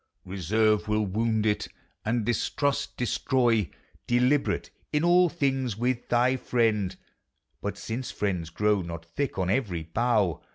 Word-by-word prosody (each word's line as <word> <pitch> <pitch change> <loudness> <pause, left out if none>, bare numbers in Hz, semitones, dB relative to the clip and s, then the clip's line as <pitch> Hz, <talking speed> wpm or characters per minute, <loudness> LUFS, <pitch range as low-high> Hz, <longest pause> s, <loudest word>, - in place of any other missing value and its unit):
Reserve 105 +4 +1
will 105 0 +1
wound 110 +2 0
it; 105 -1 +1 0.4
and 115 0 0
distrust, 140 +5 -1
destroy 120 - +1 0.4
Deliberate 125 +4 +1 0.2
in 150 +1 +1
all 175 +1 +5
things 135 -8 -1
with 120 +1 -1
thy 125 +2 +3
friend, 110 -7 +1 0.7
But - - -3
since 120 +3 -4
friends 90 -5 -2
grow 105 +3 +1
not 85 -1 -7
thick 135 +10 -3
on 95 -1 0
every 95 -10 -1
bough. 100 0 +1
110 Hz, 130 wpm, -27 LUFS, 100-125 Hz, 0.7 s, all